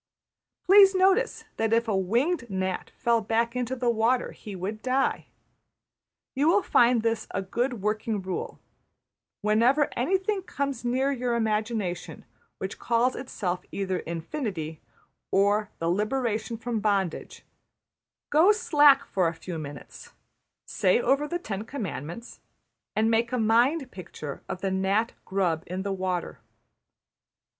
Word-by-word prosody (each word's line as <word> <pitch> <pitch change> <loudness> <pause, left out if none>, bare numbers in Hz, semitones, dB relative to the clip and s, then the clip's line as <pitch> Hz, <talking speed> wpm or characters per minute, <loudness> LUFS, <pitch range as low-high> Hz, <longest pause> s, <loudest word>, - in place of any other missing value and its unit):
\end{equation*} - - -47
Please 390 0 +7
notice 385 +6 +2
that 220 0 0
if 230 0 +2
a 215 - +1
winged 235 - 0
gnat 190 -1 -2
fell 235 -2 +2
back 230 +2 0
into 250 +1 -2
the 245 -1 +1
water 235 +3 +1
he 205 -2 -9
would 200 +4 -5
die. 260 +1 0 1.1
You 285 +3 +1
will 380 +4 +4
find 240 -1 +4
this 230 -1 -1
a 195 - -3
good 240 +2 -2
working 215 0 -1
rule: 190 -1 -5 0.8
Whenever 235 +8 +3
anything 385 - 0
comes 280 -8 -3
near 260 +3 +1
your 250 -3 -1
imagination 215 -5 -2 0.3
which 190 0 -6
calls 240 +2 +1
itself 180 -8 -3
either 190 -2 -2
``Infinity'' 165 - -4 0.5
or 205 +2 +2
``The 165 +1 +1
Liberation 225 +1 -1
from 230 0 -3
Bondage,'' 200 -5 -1 0.9
go 325 +7 +6
slack 295 -11 +5
for 185 -8 +1
a 165 - -2
few 170 -1 -6
minutes; 145 -2 -10 0.5
say 475 - +2
over 295 - +2
the 345 - -2
Ten 210 - -5
Commandments; 220 - -6 0.6
and 220 +1 +2
make 230 +1 +1
a 250 - 0
mind 250 +6 +2
picture 155 -5 -8
of 185 -1 -5
the 195 - -1
gnat 195 +4 +1
grub 180 -5 0
in 185 +2 -4
the 200 -1 -2
water. 185 -7 -3
225 Hz, 135 wpm, -27 LUFS, 190-260 Hz, 1.1 s, Please